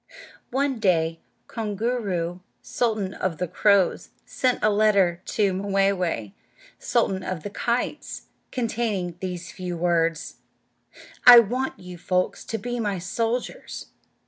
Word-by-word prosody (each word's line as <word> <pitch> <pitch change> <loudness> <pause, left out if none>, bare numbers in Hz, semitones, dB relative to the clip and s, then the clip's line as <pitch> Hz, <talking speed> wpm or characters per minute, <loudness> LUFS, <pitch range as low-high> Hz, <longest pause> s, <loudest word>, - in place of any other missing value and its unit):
One 270 -1 0
day 165 -5 +1 0.3
Koongoo'roo, 205 -5 -2 0.2
sultan 215 -5 -1
of 180 -4 -2
the 180 - -2
crows, 200 +2 +2 0.2
sent 255 -1 0
a 215 - +4
letter 200 -5 +3
to 200 -3 +1
Mway'way, 195 - 0 0.5
sultan 190 -1 0
of 185 -4 -4
the 205 - -5
kites, 240 +3 -2 0.3
containing 220 -7 -2
these 180 -2 -5
few 180 -2 -5
words: 165 -2 0 0.9
"I 245 -1 +13
want 245 +4 +2
you 180 -1 -10
folks 180 +1 -1
to 225 - -3
be 240 +3 -4
my 205 -4 -1
soldiers." 225 +7 -3
195 Hz, 120 wpm, -25 LUFS, 180-225 Hz, 0.9 s, I